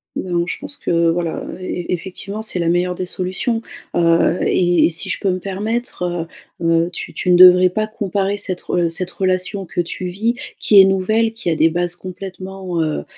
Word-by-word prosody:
Non, 175 Hz, -2 st, -1 dB
je -, -, -3 dB
pense 290 Hz, 0 st, -6 dB
que 170 Hz, -1 st, +1 dB
voilà, 170 Hz, -1 st, -1 dB
heu, -, -, -7 dB
e -, -, -12 dB, 0.2 s
e -, -, -10 dB
effectivement, 195 Hz, +4 st, -5 dB
c'est 220 Hz, -4 st, -1 dB
la 170 Hz, -, 0 dB
meilleure 175 Hz, +1 st, +1 dB
des 185 Hz, -, -3 dB
solutions, 185 Hz, +6 st, -2 dB, 0.3 s
heu, 170 Hz, 0 st, +3 dB
et 175 Hz, -1 st, +3 dB
et -, -, +3 dB
si 165 Hz, -, -4 dB
je -, -, -2 dB
peux 195 Hz, -, 0 dB
me 185 Hz, -, 0 dB
permettre, 210 Hz, +5 st, -4 dB, 0.6 s
heu, -, -, -2 dB, 0.2 s
heu, -, -, -5 dB
tu -, -, -7 dB
tu 180 Hz, -, -3 dB
ne -, -, +6 dB
devrais 180 Hz, 0 st, +8 dB
pas 215 Hz, +4 st, -1 dB
comparer 205 Hz, -2 st, -2 dB
cette 185 Hz, -3 st, -1 dB
re 175 Hz, -2 st, 0 dB
cette 180 Hz, +2 st, -1 dB
relation 185 Hz, +1 st, -1 dB
que 175 Hz, +1 st, -1 dB
tu 180 Hz, +2 st, -5 dB
vis, 210 Hz, +6 st, -1 dB, 0.3 s
qui 200 Hz, -2 st, +7 dB
est -, -, +8 dB
nouvelle, 215 Hz, +4 st, +1 dB
qui 225 Hz, -6 st, -4 dB
a 160 Hz, -, +1 dB
des 160 Hz, +1 st, +4 dB
bases 175 Hz, +1 st, -1 dB
complètement, 185 Hz, -1 st, -6 dB
heu, 155 Hz, -1 st, -1 dB
185 Hz, 210 wpm, -19 LUFS, 175-195 Hz, 0.6 s, devrais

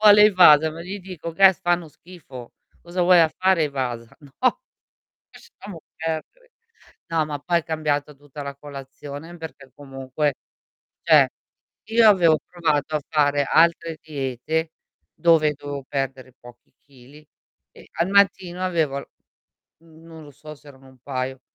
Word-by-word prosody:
Vuole 210 Hz, -1 st, +8 dB
i -, -, +3 dB
Wasa, 160 Hz, -5 st, +6 dB
ma 160 Hz, -, -10 dB
gli 195 Hz, +3 st, -7 dB
dico: 180 Hz, -3 st, -8 dB
che 195 Hz, +3 st, +6 dB
fanno 175 Hz, -2 st, -1 dB
schifo. 140 Hz, -8 st, -13 dB, 0.3 s
"Cosa 175 Hz, +1 st, -4 dB
vuoi 175 Hz, -1 st, +6 dB
a 160 Hz, -, +4 dB
fare 185 Hz, 0 st, +1 dB
i -, -, -2 dB
Wasa?" 125 Hz, -4 st, -5 dB
No, 150 Hz, -, -1 dB, 0.7 s
lasciamo 180 Hz, -6 st, -13 dB
perdere. 165 Hz, -, -6 dB, 0.6 s
No, 165 Hz, -2 st, 0 dB
ma 145 Hz, -1 st, -5 dB
poi 170 Hz, +4 st, 0 dB
è -, -, -5 dB
cambiata 150 Hz, -3 st, -2 dB
tutta 145 Hz, +1 st, -11 dB
la 140 Hz, 0 st, -6 dB
colazione 145 Hz, +3 st, -10 dB
perché 160 Hz, -5 st, -11 dB
comunque, 135 Hz, +1 st, -3 dB, 0.7 s
cioè, -, -, +5 dB, 0.6 s
io 225 Hz, +1 st, +4 dB
avevo 170 Hz, -6 st, +4 dB
provato 155 Hz, -4 st, -1 dB
a -, -, -2 dB
fare 145 Hz, -2 st, +2 dB
altre 165 Hz, 0 st, +2 dB
diete 155 Hz, +2 st, -3 dB, 0.4 s
dove 165 Hz, -3 st, +3 dB
cioè, 150 Hz, -, -2 dB
dovevo 140 Hz, -1 st, -7 dB
perdere 135 Hz, -2 st, -4 dB
pochi 120 Hz, 0 st, -17 dB
chili 140 Hz, +2 st, -18 dB, 0.5 s
e -, -, -17 dB
al 170 Hz, +2 st, -1 dB
mattino 190 Hz, -2 st, +2 dB
avevo 160 Hz, -6 st, -1 dB
l -, -, -14 dB, 0.8 s
mhmm, 160 Hz, 0 st, -19 dB
non 160 Hz, -1 st, -12 dB
lo 145 Hz, -, -13 dB
so 155 Hz, +2 st, -12 dB
se 145 Hz, -, -24 dB
erano 135 Hz, -1 st, -17 dB
un 130 Hz, -1 st, -20 dB
paio 130 Hz, 0 st, -5 dB
155 Hz, 155 wpm, -22 LUFS, 140-170 Hz, 0.8 s, Vuole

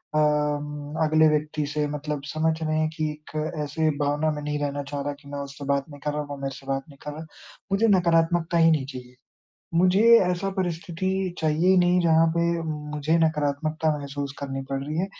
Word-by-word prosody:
अम 150 Hz, -1 st, 0 dB
अगले 155 Hz, 0 st, +5 dB
व्यक्ति 150 Hz, 0 st, -1 dB
से 150 Hz, +1 st, -1 dB
मतलब 150 Hz, 0 st, -4 dB
समझ 155 Hz, +2 st, 0 dB
रहे 155 Hz, 0 st, 0 dB
हैं 155 Hz, 0 st, +1 dB
कि 155 Hz, -1 st, -2 dB
एक 150 Hz, 0 st, -13 dB, 0.3 s
ऐसे 155 Hz, +2 st, 0 dB
भावना 145 Hz, +2 st, +1 dB
में 150 Hz, -, -4 dB
नहीं 150 Hz, 0 st, -2 dB
रहना 145 Hz, 0 st, -2 dB
चाह 145 Hz, -1 st, -2 dB
रहा 145 Hz, +1 st, -2 dB
कि -, -, -16 dB
मैं 145 Hz, 0 st, -5 dB
उससे 140 Hz, 0 st, -7 dB
बात 140 Hz, -1 st, +1 dB
नहीं 145 Hz, -1 st, -11 dB
कर 150 Hz, -, -1 dB
रहा, 150 Hz, -, -1 dB
वो 145 Hz, -1 st, -7 dB
मेरे 135 Hz, -1 st, -4 dB
से 135 Hz, -, -13 dB
बात 135 Hz, 0 st, -1 dB
नहीं 140 Hz, -, -15 dB
कर 150 Hz, -, -3 dB
रहा। 155 Hz, +2 st, -8 dB, 0.5 s
मुझे 210 Hz, +4 st, +3 dB
नकारात्मकता 170 Hz, -2 st, +3 dB
ही 165 Hz, 0 st, +6 dB
नहीं 150 Hz, -4 st, +1 dB
चाहिए। 125 Hz, -2 st, -9 dB, 0.6 s
मुझे 185 Hz, +3 st, +4 dB, 0.2 s
ऐसा 180 Hz, +1 st, 0 dB
परिस्थिति 175 Hz, 0 st, -3 dB, 0.3 s
चाहिए 160 Hz, +3 st, +1 dB
ही 190 Hz, -, +6 dB
नहीं 180 Hz, 0 st, +4 dB
जहाँ 165 Hz, -1 st, +4 dB
पे 170 Hz, -, +2 dB, 0.2 s
मुझे 150 Hz, 0 st, -1 dB
नकारात्मकता 155 Hz, 0 st, +1 dB
महसूस 140 Hz, 0 st, -5 dB
करनी 135 Hz, -1 st, -4 dB
पड़ 135 Hz, 0 st, -2 dB
रही 150 Hz, +3 st, -4 dB
है। 185 Hz, -, +1 dB
150 Hz, 200 wpm, -25 LUFS, 145-160 Hz, 0.6 s, ही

